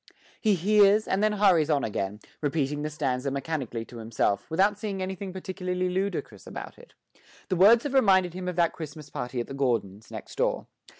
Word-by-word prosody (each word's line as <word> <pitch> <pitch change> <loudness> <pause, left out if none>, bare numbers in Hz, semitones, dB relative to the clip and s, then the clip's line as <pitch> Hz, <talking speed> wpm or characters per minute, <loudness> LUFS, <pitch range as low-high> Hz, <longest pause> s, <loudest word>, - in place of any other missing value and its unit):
He 215 -3 +3
hears, 205 +3 +4
and 190 - +1
then 215 0 +3
hurries 185 -7 +4
on 145 -3 +2
again, 105 -1 -3 0.2
repeating 145 -1 -1
the 150 - -2
stanza 140 -3 -1
mechanically 135 -5 -3
to 120 - -12
himself, 110 -3 -1
without 195 +5 +2
seeing 205 -3 -3
anything 190 +1 -4
particularly 185 -1 -3
ludicrous 195 +2 -3
about - - -8
it. - - -17 0.5
The 185 - +1
words 215 +6 +6
have 285 - -3
reminded 190 -9 +4
him 180 0 -5
of 180 - -2
that 170 -1 +2
Christmas 150 -2 -8
party 125 -1 -4
at 120 - -2
the - - -8
Gordons', 110 -6 -1
next - - -9
door. - - +1
170 Hz, 185 wpm, -27 LUFS, 135-195 Hz, 0.5 s, words